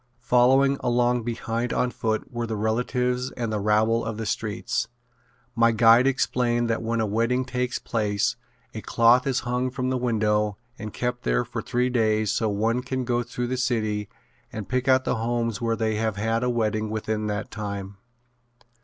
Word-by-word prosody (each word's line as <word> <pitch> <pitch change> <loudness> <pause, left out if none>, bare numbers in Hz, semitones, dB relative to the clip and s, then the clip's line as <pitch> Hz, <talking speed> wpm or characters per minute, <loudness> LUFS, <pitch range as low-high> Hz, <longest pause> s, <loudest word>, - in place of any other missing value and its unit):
Following 130 +3 +4
along 120 0 +1
behind 115 0 -2
on 125 - +1
foot 110 +2 -3
were 120 0 -2
the 110 - -3
relatives 125 +4 0
and 115 -3 -3
the 105 - 0
rabble 110 +3 +2
of 115 -1 -4
the 110 - -4
streets. 105 0 -2 0.7
My 115 -1 +4
guide 115 +3 +6
explained 120 -3 +1
that 115 - -1
when 115 0 -1
a 110 - +1
wedding 115 +5 0
takes 125 -1 -2
place 105 -3 -1 0.4
a - - -5
cloth 120 +3 +4
is 130 -2 +1
hung 125 +1 -1
from 130 0 -2
the 130 - 0
window 105 -3 +1 0.2
and 110 -1 -6
kept 120 +2 -3
there 125 - +1
for 115 -1 -5
three 125 +1 0
days 110 -3 +2
so 110 - 0
one 110 +4 0
can 130 0 -3
go 120 0 +1
through 120 +1 -4
the 130 +1 -2
city 110 -5 -1 0.4
and 105 -3 -6
pick 130 0 -1
out 130 0 +4
the 125 - -1
homes 115 -1 -1
where 115 -1 +1
they 110 -1 -1
have 110 -1 -1
had 115 +3 0
a 125 - +1
wedding 110 -2 0
within 110 0 -2
that 105 +1 -3
time. 100 -2 -5
115 Hz, 180 wpm, -25 LUFS, 110-125 Hz, 0.7 s, guide